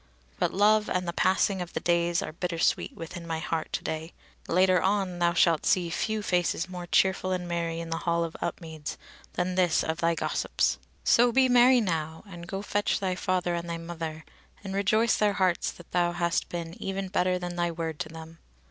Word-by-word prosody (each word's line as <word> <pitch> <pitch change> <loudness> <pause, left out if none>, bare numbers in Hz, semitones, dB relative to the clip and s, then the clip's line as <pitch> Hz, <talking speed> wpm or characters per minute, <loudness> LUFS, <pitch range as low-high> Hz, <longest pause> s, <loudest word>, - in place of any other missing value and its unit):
But - - +1
love 210 +2 +3
and 180 -1 -1
the 170 - -2
passing 190 +1 +2
of 175 - -6
the - - -1
days 170 0 +1
are - - -5
bittersweet 170 0 0
within 170 +1 -8
my 165 -1 -2
heart 160 0 -3
to - - -2
day. 160 +1 -4 0.3
Later 185 0 +4
on 190 -2 0
thou 170 0 +3
shalt 165 -2 +3
see 175 -3 +2
few 215 +4 -1
faces 175 -2 0
more 180 -1 -7
cheerful 190 +1 +2
and 180 -1 -2
merry 170 -1 -2
in 165 0 -6
the 165 - -1
hall 170 -1 0
at 165 - -8
Upmeads 160 -3 -5 0.4
than 180 +1 -1
this 180 -2 +2
of 160 0 -2
thy 170 0 +2
gossip's. - - 0 0.2
So 240 +1 +5
be 260 +2 +4
merry 250 0 +6
now, 160 -5 -2
and 170 -3 -9
go 195 +2 -4
fetch 205 0 0
thy 190 -2 -1
father 180 -1 -1
and 170 0 -3
thy 170 - -2
mother, 165 -2 -6 0.4
and 195 -1 -5
rejoice 215 +4 +2
their 210 -1 +2
hearts 185 -3 +1
that 175 - -15
thou 175 -1 +1
hast 170 0 0
been 170 -1 -5
even 195 0 -3
better 185 0 +1
than 175 -1 -5
thy 175 0 0
word 165 -2 -4
to 155 - -3
them. 160 0 -11
175 Hz, 200 wpm, -28 LUFS, 165-190 Hz, 0.4 s, merry